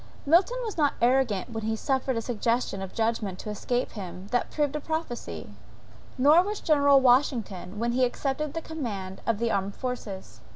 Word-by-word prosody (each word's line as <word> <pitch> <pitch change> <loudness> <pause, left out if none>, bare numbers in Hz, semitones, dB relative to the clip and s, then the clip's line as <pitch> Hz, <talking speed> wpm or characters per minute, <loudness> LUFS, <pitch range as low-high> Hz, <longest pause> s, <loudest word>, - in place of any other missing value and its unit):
Milton 355 - +4
was 435 -7 -4
not 290 -2 +3
arrogant 240 -4 +2
when 225 -1 -4
he 220 0 0
suffered 265 +1 0
a 230 - -2
suggestion 230 -3 -1
of 190 -1 -5
judgment 220 -4 -1
to 210 - -6
escape 245 +4 -2
him 185 -1 -8
that 245 - +1
proved 295 -1 0
a - - 0
prophesy; 315 -5 -4 0.7
nor 295 +6 +6
was 410 +3 -3
General 285 -3 +5
Washington 245 -7 +2
when 235 +2 0
he 255 +2 +2
accepted 270 +4 0
of 300 - -8
the 330 - -4
command 205 -12 -5
of 230 -2 +2
the 235 +1 0
American 195 -2 -1
forces. 200 - -6
245 Hz, 180 wpm, -27 LUFS, 210-285 Hz, 0.7 s, nor